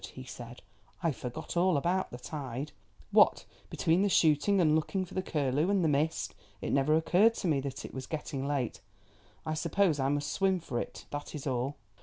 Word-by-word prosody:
he - - -7
said. - - -10 0.4
"I 165 - +3
forgot 125 +1 -6
all 175 -2 +3
about 180 +6 0
the 125 - -7
tide. 135 0 -5 0.4
What - - +5 0.2
between 165 +3 +2
the 205 - +3
shooting 165 +4 +4
and 155 -4 +4
looking 185 +4 0
for - - -14
that 185 0 -3
curlew, 150 +2 +1
and 200 -3 +2
the - - +3
mist, 150 +2 0 0.3
it - - -3
never 140 +3 +3
occurred 195 +8 +4
to 190 - -2
me 150 -4 +2
that 135 0 -5
it - - -9
was 130 -1 -6
getting 145 -3 -4
late. 140 -5 -2 0.6
I 155 - -1
suppose 165 0 +1
I 135 0 +1
must 145 +1 -1
swim 190 -1 +2
for 125 -8 -3
it, - - -6
that 145 +1 -5
is 145 - -6
all." 130 +1 -1
155 Hz, 200 wpm, -31 LUFS, 140-175 Hz, 0.6 s, What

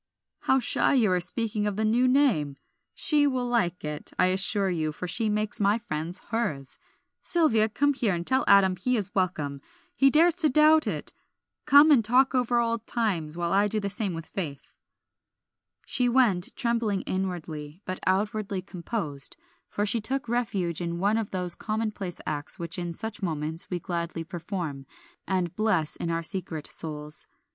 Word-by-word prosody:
"How 265 - +2
shy 265 - +2
you 225 -7 +3
are 180 - +3
of - - -1
speaking 210 +3 -1
the 210 +1 -1
new 240 +4 +3
name! 245 - +2 0.4
'She' 295 -2 +3
will 255 -3 -1
like 200 -10 0
it, 150 0 -6
I 185 - +4
assure 195 0 +1
you, 155 -3 -1
for 180 +4 -6
she 220 +5 0
makes 210 0 -1
my 205 +1 +3
friends 170 -5 -5
hers. 155 - -3 0.4
Sylvia, 225 -11 +2
come 285 +6 +2
here, 225 -8 0
and 170 0 -4
tell 260 +4 +2
Adam 195 -2 +6
he 250 +6 0
is 200 -1 -3
welcome; 155 -7 -1 0.3
he 275 - +5
dares 325 +5 +5
to 320 -4 +2
doubt 305 +3 +5
it. - - -4 0.5
Come 290 +2 +8
and 255 -6 +6
talk 255 +5 +4
over 245 -2 +1
old 230 -1 -1
times, 175 -9 -1
while 170 0 -1
I 200 +1 +4
do 215 +1 -1
the 200 -1 -3
same 200 -3 -1
with 165 -1 -6
Faith." 145 -8 -6 1.1
She 250 -1 +1
went, 230 -8 +3
trembling 230 -5 0
inwardly, 170 -3 -4
but 185 - -4
outwardly 200 0 0
composed, 170 - -4 0.3
for 205 - -2
she 215 +2 +2
took 265 +3 -2
refuge 200 -8 -1
in 170 0 -3
one 205 +5 +2
of 220 - -3
those 180 -2 -2
commonplace 215 -5 -3
acts 145 -1 -3
which 170 +1 -4
in 175 -1 -3
such 220 +4 -6
moments 160 -2 -2
we 180 - -2
gladly 170 -2 -3
perform, 165 -5 -5 0.4
and 180 -3 -1
bless 190 -8 +1
in 170 - -4
our 165 0 -1
secret 165 -4 -4
souls. 150 -1 -6
195 Hz, 170 wpm, -27 LUFS, 170-230 Hz, 1.1 s, Come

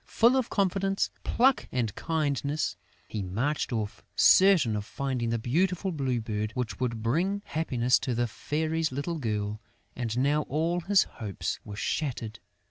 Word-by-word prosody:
Full 235 +3 +4
of 260 -3 +1
confidence, 195 0 +1
pluck 260 +2 +3
and 115 -5 -1
kindness, 150 -2 -1 0.3
he 110 - -4
had 95 -2 -4
marched 140 +11 -1
off, 110 -3 -3
certain 185 - +6
of 105 - -2
finding 125 0 -2
the 115 - +1
beautiful 180 - 0
Blue 135 -6 -1
Bird 110 -1 -3
which 120 -6 -3
would 115 -3 -2
bring 185 - 0
happiness 125 -6 +1
to 125 - -2
the 120 +1 +1
Fairy's 155 +6 -1
little 150 +5 -3
girl. 105 -3 -2 0.3
And 120 -2 -3
now 145 +4 +3
all 165 +4 0
his 190 +3 +4
hopes 105 -6 -5
were 105 - -8
shattered! 115 -2 -3
135 Hz, 155 wpm, -28 LUFS, 115-165 Hz, 0.3 s, certain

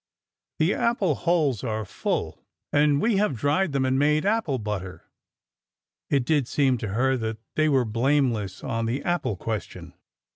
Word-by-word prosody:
The 160 +5 +2
apple 210 -8 +1
holes 155 - +1
are 110 -3 -2
full, 95 - -3 0.3
and 145 -1 +4
we 220 +1 +2
have 205 -8 +1
dried 150 - +1
them 135 -1 0
and 130 +1 +1
made 150 +3 +2
apple 205 -10 +1
butter.'' 105 -5 -5 1.1
It 135 -3 +1
did 145 -3 +1
seem 130 -3 +1
to 110 - -3
her 130 +3 +2
that 110 -1 -3 0.2
they 155 0 +2
were 135 -4 +3
blameless 115 -4 0
on 115 -3 -2
the 130 +5 -2
apple 165 - -1
question. 110 +3 -5
135 Hz, 155 wpm, -25 LUFS, 115-155 Hz, 1.1 s, and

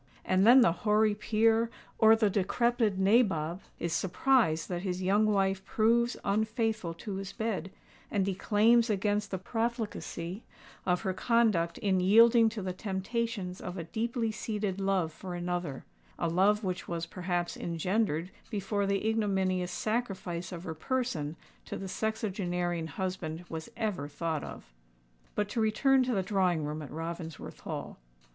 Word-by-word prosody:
And 185 +3 +3
then 255 +2 +9
the 235 - +5
hoary 210 +4 +2
peer 225 +2 +2 0.3
or 220 0 +7
the 215 -3 +2
decrepid 220 +2 +1
nabob 190 -5 +2 0.2
is 170 -1 -2
surprised 190 -4 +2
that 175 -1 -3
his 185 -1 -3
young 205 +3 +3
wife 195 -2 +1
proves 235 +2 +2
unfaithful 215 -3 0
to 195 +3 -5
his 195 -1 -5
bed, 220 -4 -2 0.4
and 200 -3 +1
declaims 215 +5 +3
against 205 0 0
the 190 - -2
profligacy 220 -3 -3 0.4
of 180 -1 +2
her 190 -3 -1
conduct 210 -5 +2
in 190 -2 +1
yielding 225 +4 +6
to 215 -3 -6
the 185 -1 -2
temptations 195 0 -3
of 180 +1 -6
a 170 - -3
deeply 225 +6 -2
seated 210 -3 -3
love 190 -5 +1
for 180 +1 -7
another—a 140 - -4
love 200 +6 +3
which 185 -2 -3
was 170 -1 -3
perhaps 175 0 -2
engendered 175 0 -1 0.2
before 200 -1 -1
the 200 +2 0
ignominious 190 -5 0
sacrifice 190 -6 -2
of 175 -1 -6
her 160 - -4
person 165 - -2 0.3
to - - -5
the 195 - -6
sexagenarian 180 -6 -2
husband 175 0 -4
was 160 -1 -6
ever 200 -10 -2
thought 155 0 -3
of! - - -10 0.6
But 210 - 0
to 225 - -1
return 265 +5 +3
to 250 -2 0
the 190 - +1
drawing 185 -5 +1
room 150 +1 -4
at 145 - -8
Ravensworth 165 0 -6
Hall. - - -6
195 Hz, 150 wpm, -30 LUFS, 175-220 Hz, 0.6 s, then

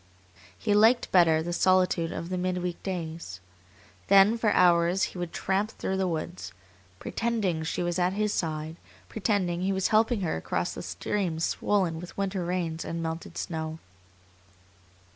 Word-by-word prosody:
He 205 - 0
liked 225 +4 +4
better 165 -3 +5
the 175 +1 -3
solitude 180 -2 +2
of 170 - -5
the 185 - -2
midweek 180 -1 -2
days. 165 - -5 0.7
Then 200 +3 +6
for 225 -2 +1
hours 175 -1 +4
he 180 - -7
would 175 -1 -4
tramp 195 +3 -1
through 190 -3 -3
the 190 -1 +1
woods, 170 - -4 0.4
pretending 210 - -1
she 160 - -2
was 175 +1 -1
at 180 +1 +2
his 210 +1 0
side, 155 0 -3 0.3
pretending 190 -5 0
he 190 +1 0
was 190 -1 0
helping 220 0 +3
her 170 - -1
across 80 - -2
the - - -6
streams 175 -6 -2
swollen 185 -6 0
with 180 - -10
winter 195 -2 -1
rains 170 -2 -2
and 165 0 -4
melted 165 0 -5
snow. 160 -1 -4
180 Hz, 155 wpm, -27 LUFS, 165-195 Hz, 0.7 s, Then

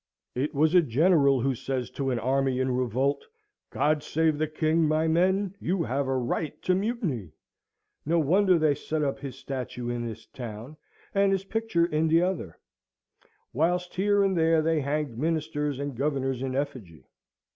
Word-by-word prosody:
It 140 +4 -2
was 155 +3 +3
a 180 - +7
general 140 -1 +3
who 135 +2 +1
says 130 0 -4
to 135 -1 -2
an 125 - 0
army 130 +1 0
in 130 0 +1
revolt, 130 +3 0 0.5
"God 150 0 +1
save 160 0 0
the 155 - +1
king! 155 +1 +1
My 155 +1 +1
men, 185 +4 +2
you 180 -1 -1
have 135 0 -1
a 135 0 0
right 130 +5 -2
to 185 - +2
mutiny!" 185 - -2 0.7
No 165 +3 +1
wonder 180 +4 +4
they 155 -2 +3
set 150 +2 -3
up 135 -1 -1
his 135 -2 -7
statue 125 -3 -5
in 120 0 -3
this 115 0 -8
town, 120 +3 -8 0.4
and 200 0 +3
his 195 -1 0
picture 220 -5 0
in 160 -1 0
t'other; 165 - +1 1.0
whilst 175 +5 0
here 200 +2 +2
and 195 -1 +1
there 165 -1 +3
they 160 -1 +1
hanged 140 -4 -2
Ministers 150 -2 -1
and 140 -1 -4
Governors 135 -1 -1
in 130 -1 -3
effigy. 130 - -5
150 Hz, 165 wpm, -27 LUFS, 130-165 Hz, 1.0 s, a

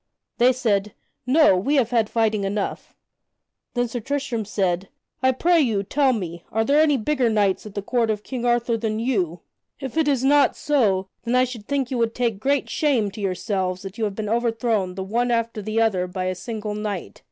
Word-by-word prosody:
They 245 +2 +6
said, 210 -5 0 0.3
"No, 300 -5 +5
we 230 +12 +1
have 250 -4 +2
had 225 -3 +2
fighting 220 -3 +1
enough." 195 +1 -3 0.8
Then 245 0 +1
Sir 240 +1 -4
Tristram 270 -3 -2
said: 190 -2 -1 0.3
"I 260 0 +4
pray 335 +6 +3
you, 220 -7 +1
tell 270 +6 +2
me, 175 -7 -4
are 225 +1 +1
there 290 +4 +4
any 295 -3 +4
bigger 255 0 +1
knights 205 -2 +1
at 205 - -12
the 205 - -3
court 235 +1 0
of 210 -1 -1
King 255 -3 -5
Arthur 240 -1 +1
than 215 -1 -2
you? 190 -9 -1 0.4
If 270 +1 -6
it 320 -2 +3
is 270 -3 +1
not 285 0 +4
so, 210 -10 +1 0.2
then 235 +1 0
I 255 - +5
should 240 -5 -6
think 275 -3 -1
you 250 - -1
would 230 -1 0
take 235 -5 -1
great 275 +4 +1
shame 260 -10 +1
to 210 - -8
yourselves 185 -1 -2
that 195 +3 -8
you 220 - +1
have 200 -2 -3
been 215 0 -3
overthrown 225 -4 0
the 190 - -4
one 235 +5 0
after 230 -2 -1
the 215 +2 -1
other 195 -5 +2
by 185 +1 -4
a 185 - 0
single 215 +2 -5
knight. 210 -3 -5
225 Hz, 210 wpm, -23 LUFS, 200-255 Hz, 0.8 s, They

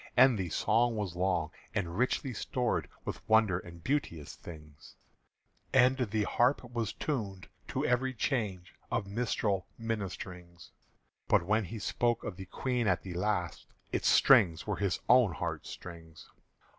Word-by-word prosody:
_" - - -19
And 130 0 +7
the 95 -4 -2
song 115 +7 +2
was 100 -5 -3
long, 90 -3 0 0.2
and 90 -5 -2
richly 125 +3 0
stored 120 +3 -1 0.2
With - - -4
wonder 110 -5 +4
and 85 -2 -12
beauteous 105 - -2
things; 75 -3 -12 0.8
And 130 0 +6
the 110 -4 0
harp 125 +7 +2
was 120 -3 -3
tuned 100 - -4 0.2
to - - -2
every 130 +1 +1
change 105 - -2 0.2
Of - - -1
minstrel 100 -3 -1
ministerings; 90 -6 -6 0.6
But - - +4
when 105 +2 +2
he 110 +6 -6
spoke 120 +3 0
of 100 - -5
the 95 0 -9
Queen 125 0 -1
at 95 -3 +1
the 95 - -6
last, 90 -1 -2 0.2
Its - - 0
strings 85 -5 +5
were 105 -2 -2
his 100 -4 0
own 120 -6 +6
heart 75 - -4
strings. 80 -2 -10
105 Hz, 150 wpm, -31 LUFS, 90-120 Hz, 0.8 s, And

